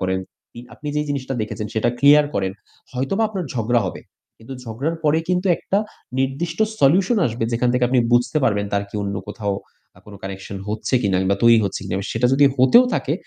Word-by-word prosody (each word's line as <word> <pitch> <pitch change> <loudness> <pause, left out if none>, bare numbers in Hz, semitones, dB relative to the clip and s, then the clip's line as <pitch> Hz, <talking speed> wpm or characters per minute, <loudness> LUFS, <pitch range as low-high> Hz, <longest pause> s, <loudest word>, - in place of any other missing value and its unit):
করেন। 95 0 0 0.3
আপনি, - - -14 0.2
আপনি 150 - -12
যেই 150 0 -1
জিনিসটা 135 -1 -3
দেখেছেন 105 0 -5
সেটা 110 +2 +1
ক্লিয়ার 145 +1 +6
করেন। 95 -1 -1 0.4
হয়তোবা 135 - -1
আপনার 190 -5 -4
ঝগড়া 120 0 +1
হবে 90 - -6 0.4
কিন্তু 115 +4 -10
ঝগড়ার 135 +9 -3
পরে 150 +1 +3
কিন্তু 180 +1 0
একটা 195 - -1 0.4
নির্দিষ্ট 140 +6 -2 0.2
solution 185 - +4
আসবে 115 0 -2
যেখান 120 +1 +1
থেকে 125 0 +2
আপনি 130 0 +2
বুঝতে 120 +3 +2
পারবেন 105 -4 +1
তার 100 0 0
কি - - -20
অন্য 100 0 -3
কোথাও 105 -1 -3 0.4
আ - - -16
কোনো 105 -1 -11
connection 95 +1 -7
হচ্ছে 110 +4 -2
কিনা 95 -3 +1
কিংবা 95 +1 +1
তৈরি 115 -1 +7
হচ্ছে 100 - -3
কিনা। - - -4 0.2
সেটা 115 +2 +2
যদি 140 +2 +5
হতেও 230 - +6
থাকে - - -1
125 Hz, 195 wpm, -21 LUFS, 105-145 Hz, 0.4 s, তৈরি